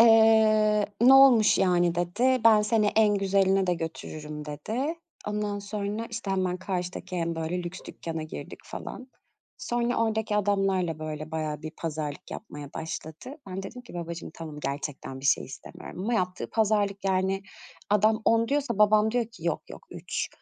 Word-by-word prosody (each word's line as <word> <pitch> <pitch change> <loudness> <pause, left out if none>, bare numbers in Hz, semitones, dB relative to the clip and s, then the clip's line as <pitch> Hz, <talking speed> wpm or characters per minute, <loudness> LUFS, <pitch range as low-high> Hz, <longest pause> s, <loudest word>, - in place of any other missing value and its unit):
Eee, 220 -2 +6
"Ne 255 +3 +8
olmuş 255 -6 +7
yani?" 175 -2 +3
dedi, 230 +10 +1
"Ben 215 -2 +7
seni 210 0 +2
en 210 -2 +5
güzeline 195 -1 +2
de 180 - +2
götürürüm." 155 -2 -6
dedi. 230 - -3 0.3
Ondan 210 0 -2
sonra, 205 +2 -4
işte, 225 -3 -4
hemen 185 -1 0
karşıdaki 180 -1 -4
en, 165 -1 -1
böyle, 165 +2 -2
lüks 175 +2 -6
dükkâna 165 -1 -5
girdik 155 - -8
falan. 255 0 -8 0.5
Sonra 240 0 -1
oradaki 220 -1 0
adamlarla, 195 -5 +1
böyle, 155 0 -5
bayağı 155 -1 -3
bir 155 - -5
pazarlık 155 0 -5
yapmaya 145 -8 -8
başladı. 160 - -6
Ben 190 +1 -4
dedim 250 +6 -8
ki, 245 - -13
"Babacığım, 170 -1 -5
tamam. 155 -3 -8
Gerçekten 140 -1 -4
bir 135 - -2
şey - - +3
istemiyorum." 175 +7 -10
Ama 235 +3 0
yaptığı 185 -3 -2
pazarlık, 205 -3 +1
yani, 190 0 +1 0.5
adam 215 +2 +3
"10" 230 0 +3
diyorsa 275 -6 0
babam 215 +1 +5
diyor 240 0 0
ki, 230 +2 -14
"Yok, - - 0
yok, - - -11
3." - - -4
195 Hz, 160 wpm, -27 LUFS, 165-220 Hz, 0.5 s, Ne